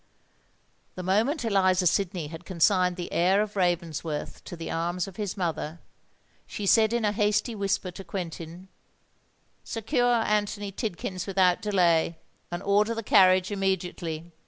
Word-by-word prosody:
The 185 - -6
moment 230 - +1
Eliza 185 -3 +3
Sidney 180 -1 +1
had 160 +2 -9
consigned 180 0 +2
the 175 -1 -6
heir 185 +4 +3
of 210 0 -2
Ravensworth 170 -4 -2
to - - -7
the 165 -1 -6
arms 175 +2 -1
of 190 - -11
his 205 -3 -3
mother, 170 -2 -3 0.7
she 205 - -5
said 220 +2 +5
in 235 -2 0
a 205 - +2
hasty 210 +2 +1
whisper 195 -3 -1
to 195 - -9
Quentin, 170 0 -7 1.0
"Secure 245 +2 0
Anthony 205 -1 -1
Tidkins 185 -3 -4
without 185 -2 +3
delay, 170 -5 +2 0.3
and 175 0 -5
order 210 +3 +2
the 225 - -4
carriage 185 -2 +5
immediately." 180 -4 -2
185 Hz, 140 wpm, -27 LUFS, 175-205 Hz, 1.0 s, said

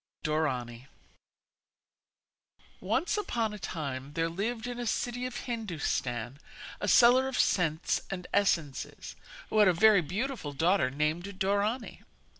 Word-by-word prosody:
DORANI 130 -6 -2 1.9
Once 365 - 0
upon 230 - -1
a 210 - -7
time 140 -6 -5
there 165 +1 0
lived 220 +7 -3
in 245 0 -5
a 240 - -3
city 245 +4 -1
of 240 -1 -6
Hindustan 145 - -3 0.4
a 205 - -3
seller 250 +5 +6
of 265 - -3
scents 165 -3 +1
and 180 -2 -5
essences, 165 -9 -1 0.4
who 215 - +2
had 210 - +7
a 185 - +5
very 200 +3 +6
beautiful 190 - -3
daughter 165 0 +2
named 150 +6 -1
Dorani. 205 +5 -1
190 Hz, 125 wpm, -30 LUFS, 150-230 Hz, 1.9 s, had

